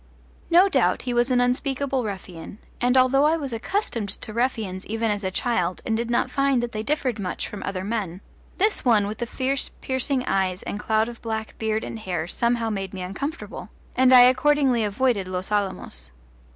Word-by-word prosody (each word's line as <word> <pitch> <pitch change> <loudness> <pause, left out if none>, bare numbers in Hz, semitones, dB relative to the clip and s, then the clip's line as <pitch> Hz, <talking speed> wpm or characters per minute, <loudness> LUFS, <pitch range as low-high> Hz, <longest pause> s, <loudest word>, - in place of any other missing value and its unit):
No 355 +3 +6
doubt 385 - +2
he 250 - -2
was 240 +1 +2
an 250 -1 +3
unspeakable 265 +1 0
ruffian, 185 -3 -7 0.2
and 250 +2 +3
although 265 +2 +5
I 320 +2 +3
was 275 -6 -4
accustomed 230 - -2
to 215 +2 -7
ruffians 220 -6 -1
even 225 0 0
as 205 0 -2
a 190 - 0
child 185 -3 -1
and 220 - 0
did 235 +1 -2
not 240 - +1
find 275 -3 +2
that 240 - -3
they 215 - -3
differed 255 -3 -1
much 185 -2 -3
from 205 - -8
other 190 -1 -3
men, 195 -4 -3 0.4
this 415 +2 +2
one 220 -5 +4
with 210 +2 -5
his 240 -2 -3
fierce 265 +1 -1
piercing 260 0 -1
eyes 190 -1 0
and 205 - -4
cloud 220 +1 +1
of 240 0 -9
black 220 -1 -4
beard 220 0 -1
and 225 - -6
hair, 175 -6 -3
somehow 235 +2 0
made 195 -2 -4
me 185 - -5
uncomfortable, 280 - -5 0.3
and 255 0 +5
I 250 -1 +10
accordingly 255 -1 +4
avoided 210 -1 0
Los 185 +2 -4
Alamos. 190 - -1
230 Hz, 190 wpm, -24 LUFS, 200-255 Hz, 0.4 s, I